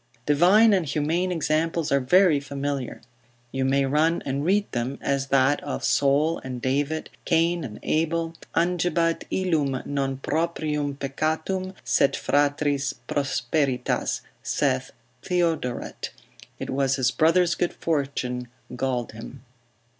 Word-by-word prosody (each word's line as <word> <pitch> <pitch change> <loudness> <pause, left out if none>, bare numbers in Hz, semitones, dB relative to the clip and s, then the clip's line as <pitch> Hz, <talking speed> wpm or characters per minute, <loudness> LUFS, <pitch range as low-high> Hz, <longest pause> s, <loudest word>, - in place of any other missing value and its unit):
Divine 185 +9 +5
and 190 -3 +3
humane 165 +6 0
examples 160 0 0
are 140 - +4
very 165 +3 +4
familiar; 140 -2 -4 0.5
you 135 0 -1
may 135 +1 +2
run 155 +5 +2
and 140 +1 -2
read 200 +5 +2
them, 125 +3 -2
as 140 -1 -1
that 135 +1 +3
of 145 - -4
Saul 140 +4 +2
and 125 -1 -5
David, 145 +5 -1
Cain 170 0 +2
and 110 -6 -7
Abel, 165 +1 0 0.2
angebat 170 -1 +1
illum 150 -8 0
non 135 -2 -1
proprium 150 -1 -1
peccatum, 160 +7 -2
sed 140 - +2
fratris 145 -1 +1
prosperitas, 135 -2 0 0.2
saith - - 0 0.3
Theodoret, 165 -8 -1 0.5
it - - -5
was 135 0 +1
his 130 -2 +2
brother's 170 +4 +3
good 175 - -1
fortune 135 -5 -2 0.3
galled 125 -2 -2
him. 115 +3 -10
145 Hz, 120 wpm, -25 LUFS, 135-165 Hz, 0.5 s, Divine